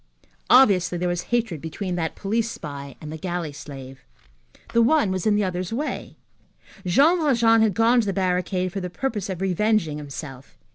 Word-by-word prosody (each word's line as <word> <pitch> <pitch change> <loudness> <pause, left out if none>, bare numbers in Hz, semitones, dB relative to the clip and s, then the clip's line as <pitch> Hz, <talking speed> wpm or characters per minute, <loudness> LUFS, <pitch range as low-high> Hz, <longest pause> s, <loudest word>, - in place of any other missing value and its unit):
Obviously, 195 -9 +5
there 180 +1 -1
was 175 0 -2
hatred 225 -10 -1
between 180 +4 -4
that 165 -2 -2
police 225 +3 -1
spy 140 - -8
and 155 - -8
the 160 - -7
galley 175 -3 -3
slave. 135 -2 -10 0.7
The 235 - +4
one 240 -3 +3
was 185 +1 -1
in 210 - +4
the 210 - +2
other's 185 0 -3
way. 285 +7 -4 0.7
Jean 295 - +4
Valjean 235 -7 +4
had 215 -4 +2
gone 235 +2 +4
to 215 - -4
the - - +1
barricade 185 -1 0
for 195 - -3
the 180 - -4
purpose 210 +1 -3
of 185 -1 -4
revenging 190 -4 +1
himself. 140 -2 -9
185 Hz, 180 wpm, -23 LUFS, 165-225 Hz, 0.7 s, Obviously